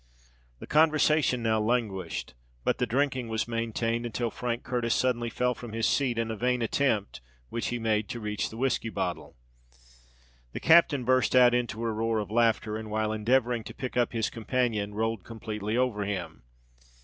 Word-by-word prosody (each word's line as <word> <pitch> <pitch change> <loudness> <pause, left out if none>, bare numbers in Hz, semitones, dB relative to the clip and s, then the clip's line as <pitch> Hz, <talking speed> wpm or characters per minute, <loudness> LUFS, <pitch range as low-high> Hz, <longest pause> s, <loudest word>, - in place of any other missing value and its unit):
The - - -9
conversation 155 -4 +3
now 110 -1 +2
languished; 95 - -2 0.3
but - - 0
the 125 - +1
drinking 130 0 0
was 110 0 -2
maintained, 115 0 -1
until 120 0 -2
Frank 120 -1 -3
Curtis 120 -1 0
suddenly 120 -2 0
fell 125 +1 0
from 120 -2 -9
his 115 0 0
seat 130 -4 +1
in 115 -1 -1
a - - -3
vain 125 +2 0
attempt 110 - 0 0.3
which 115 - -3
he 120 - -2
made 110 -3 0
to 120 - -4
reach 105 -1 -2
the 110 - -10
whiskey 125 -2 0
bottle. - - -4 1.2
The - - -4
captain 160 -6 +5
burst 130 +1 +3
out 125 -1 +7
into 120 -2 -1
a 115 - 0
roar 110 +1 0
of 105 -2 -3
laughter, 115 -1 +2
and 110 -1 -7
while 110 0 0
endeavouring 120 +1 +1
to - - -9
pick 130 - -5
up 120 -1 +2
his 115 -2 -1
companion, 110 -3 -1
rolled 110 -2 -1
completely 110 -1 -4
over 125 -5 +1
him. 90 -9 -4
115 Hz, 175 wpm, -28 LUFS, 110-125 Hz, 1.2 s, out